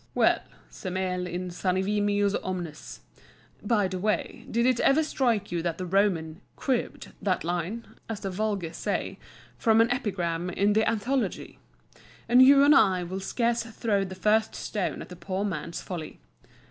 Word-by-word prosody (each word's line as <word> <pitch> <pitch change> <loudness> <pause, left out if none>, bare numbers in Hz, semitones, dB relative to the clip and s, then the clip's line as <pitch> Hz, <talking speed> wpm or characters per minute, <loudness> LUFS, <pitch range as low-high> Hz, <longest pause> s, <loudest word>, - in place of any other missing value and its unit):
Well, - - +4 0.3
semel 180 - -3
insanivimus 195 +3 0
omnes 175 -5 -6 0.6
(by 210 -2 +2
the 185 0 -4
way, 210 +3 -2
did 235 +1 +1
it 255 -2 +3
ever 300 +4 +4
strike 235 -9 0
you 170 -1 -1
that 170 -1 -2
the 185 - -4
Roman 180 -3 +1
"cribbed" 260 -3 -2
that 185 -3 0
line, 175 +7 -3 0.2
as 220 -2 -4
the 195 - -3
vulgar 195 -4 -2
say, - - -3 0.4
from 225 -1 +4
an 230 +1 +4
epigram 180 -8 -1
in 200 +3 +2
the 220 +1 +3
Anthology?), 240 +4 -2 0.7
and 245 +2 +6
you 275 +1 +8
and 290 +1 +7
I 190 -8 +4
will 185 +2 -4
scarce 235 +4 0
throw 225 -3 -1
the 185 -1 -6
first 215 +4 +2
stone 205 -4 -3
at - - -14
the 180 - -9
poor 190 +3 -3
man's 170 -3 -4
folly. 170 -4 -6
200 Hz, 155 wpm, -27 LUFS, 180-225 Hz, 0.7 s, you